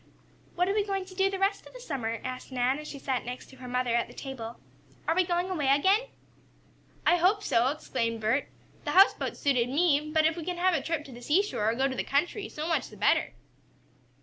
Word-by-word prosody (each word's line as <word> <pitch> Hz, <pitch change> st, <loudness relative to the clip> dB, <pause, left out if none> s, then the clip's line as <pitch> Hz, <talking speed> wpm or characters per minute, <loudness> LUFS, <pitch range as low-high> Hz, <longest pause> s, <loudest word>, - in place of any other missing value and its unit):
"What 360 Hz, +1 st, +2 dB
are 390 Hz, -, +1 dB
we 420 Hz, 0 st, +2 dB
going 390 Hz, -2 st, -2 dB
to 375 Hz, -, -12 dB
do 385 Hz, +1 st, +2 dB
the 390 Hz, -, -3 dB
rest 395 Hz, +1 st, 0 dB
of -, -, -15 dB
the -, -, -10 dB
summer?" 245 Hz, -, -3 dB
asked 255 Hz, +1 st, -6 dB
Nan, 255 Hz, +2 st, +1 dB
as 300 Hz, -, -8 dB
she 285 Hz, -, -7 dB
sat 265 Hz, -2 st, -2 dB
next 250 Hz, +3 st, -7 dB
to 265 Hz, -, -15 dB
her 255 Hz, 0 st, -9 dB
mother 250 Hz, -1 st, 0 dB
at 235 Hz, 0 st, +1 dB
the -, -, -14 dB
table. 240 Hz, -4 st, -7 dB, 0.5 s
"Are -, -, +3 dB
we 370 Hz, -, +4 dB
going 350 Hz, 0 st, 0 dB
away 325 Hz, -7 st, -1 dB
again?" 380 Hz, -, +4 dB, 1.0 s
"I 350 Hz, -, +5 dB
hope 390 Hz, +4 st, +3 dB
so!" 235 Hz, -, +3 dB
exclaimed 235 Hz, -5 st, -2 dB
Bert. 225 Hz, +6 st, 0 dB, 0.3 s
"The -, -, -2 dB
houseboat 390 Hz, +2 st, +4 dB
suited 250 Hz, -5 st, +1 dB
me, 300 Hz, 0 st, +2 dB
but 315 Hz, 0 st, +3 dB
if 320 Hz, 0 st, +2 dB
we 340 Hz, -, -5 dB
can 355 Hz, +1 st, -3 dB
have 365 Hz, +1 st, +3 dB
a 325 Hz, -, +1 dB
trip 325 Hz, -3 st, -2 dB
to 275 Hz, -, -11 dB
the 240 Hz, 0 st, -11 dB
seashore, 300 Hz, -, +1 dB
or 225 Hz, -, 0 dB
go 265 Hz, +2 st, +2 dB
to 265 Hz, -, -4 dB
the -, -, -1 dB
country, 350 Hz, -, -1 dB
so 305 Hz, +1 st, -5 dB
much 330 Hz, -, 0 dB
the -, -, -13 dB
better." -, -, +2 dB
300 Hz, 235 wpm, -28 LUFS, 255-365 Hz, 1.0 s, I